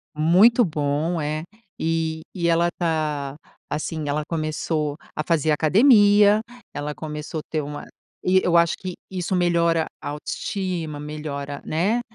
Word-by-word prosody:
Muito 195 Hz, +10 st, +5 dB
bom 155 Hz, +2 st, -1 dB
é. 155 Hz, +1 st, -2 dB, 0.4 s
E 160 Hz, -1 st, -1 dB
e 170 Hz, -2 st, 0 dB
ela 170 Hz, +1 st, +3 dB
tá, 150 Hz, -5 st, -1 dB, 0.3 s
assim, 155 Hz, 0 st, -3 dB
ela 150 Hz, +1 st, 0 dB
começou 155 Hz, -2 st, -2 dB, 0.2 s
a 155 Hz, -, -1 dB
fazer 160 Hz, -2 st, +1 dB
academia, 205 Hz, -, +5 dB, 0.3 s
ela 145 Hz, +1 st, -4 dB
começou 150 Hz, +1 st, -5 dB
ter 155 Hz, -, 0 dB
uma 145 Hz, 0 st, -7 dB, 0.4 s
e 185 Hz, +1 st, +4 dB
eu 175 Hz, -1 st, +2 dB
acho 170 Hz, -1 st, +3 dB
que 185 Hz, -1 st, -5 dB, 0.2 s
isso 185 Hz, 0 st, -2 dB
melhora 170 Hz, -2 st, +2 dB
a -, -, -5 dB
autoestima, 160 Hz, +1 st, -4 dB
melhora, 145 Hz, -1 st, -5 dB
né 200 Hz, +10 st, +1 dB
160 Hz, 135 wpm, -23 LUFS, 150-175 Hz, 0.4 s, Muito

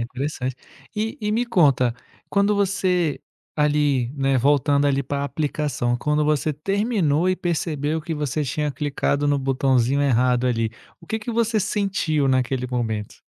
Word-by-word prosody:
interessante. 130 Hz, +1 st, -3 dB, 0.4 s
E 220 Hz, +1 st, -2 dB
e 210 Hz, -1 st, -1 dB
me 235 Hz, +3 st, +1 dB
conta, 140 Hz, -, +3 dB, 0.3 s
quando 200 Hz, +1 st, +2 dB
você, 185 Hz, -6 st, +1 dB, 0.3 s
ali 145 Hz, -5 st, +1 dB
né, 135 Hz, -2 st, +1 dB
voltando 145 Hz, +2 st, +3 dB
ali 140 Hz, 0 st, +1 dB
para 140 Hz, +1 st, -3 dB
aplicação, 140 Hz, -3 st, -1 dB
quando 150 Hz, +4 st, 0 dB
você 150 Hz, 0 st, +1 dB
terminou 185 Hz, -, 0 dB
e 185 Hz, -, +1 dB
percebeu 160 Hz, -3 st, -1 dB
que 160 Hz, +1 st, -4 dB
você 150 Hz, 0 st, -2 dB
tinha 150 Hz, +3 st, -1 dB
clicado 145 Hz, +1 st, -1 dB
no 145 Hz, 0 st, +2 dB
botãozinho 135 Hz, -1 st, +1 dB
errado 125 Hz, -2 st, +2 dB
ali, 115 Hz, -3 st, 0 dB, 0.3 s
o 165 Hz, -, -16 dB
que 220 Hz, -, -2 dB
que 220 Hz, +2 st, -6 dB
você 230 Hz, -1 st, +1 dB
sentiu 195 Hz, -8 st, 0 dB
naquele 130 Hz, -1 st, 0 dB
momento? 110 Hz, -4 st, -3 dB
145 Hz, 150 wpm, -23 LUFS, 130-175 Hz, 0.4 s, conta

